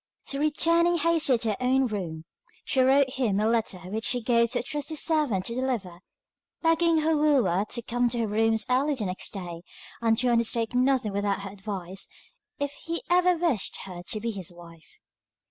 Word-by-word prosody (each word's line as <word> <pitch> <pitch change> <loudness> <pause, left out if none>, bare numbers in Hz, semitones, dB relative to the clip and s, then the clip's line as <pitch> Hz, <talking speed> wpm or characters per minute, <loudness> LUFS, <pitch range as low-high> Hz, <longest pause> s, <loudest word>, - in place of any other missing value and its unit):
So 275 - -3
returning 335 +3 +3
hastily 320 -5 +3
to 225 -1 -2
her 210 - -1
own 260 +1 +2
room, 175 -8 -4 0.4
she 265 - +2
wrote 265 +1 +4
him 240 -7 0
a 215 - +1
letter 225 -4 +1
which 220 +4 -3
she 245 - +2
gave 235 0 +2
to - - 0
a - - -8
trusty 295 +3 -4
servant 295 - +1
to 235 - -2
deliver, 235 -9 -3 0.6
begging 330 0 +3
her 320 +1 +2
wooer 255 - +2
to 235 - -1
come 245 +1 0
to 240 - -3
her 225 - 0
rooms 220 +1 +1
early 275 +4 +1
the 220 -5 -2
next 185 0 -3
day, 175 -4 -7 0.4
and 225 -1 +2
to 250 +1 +1
undertake 230 -1 +1
nothing 250 -4 +2
without 200 -1 -1
her 195 - -6
advice, 195 -2 -5 0.5
if 285 0 -2
he 335 0 -3
ever 360 0 +4
wished 320 - 0
her 180 -2 -8
to 215 - -2
be 230 +2 -2
his 190 -5 -6
wife. 170 -2 -15
235 Hz, 190 wpm, -26 LUFS, 200-285 Hz, 0.6 s, wrote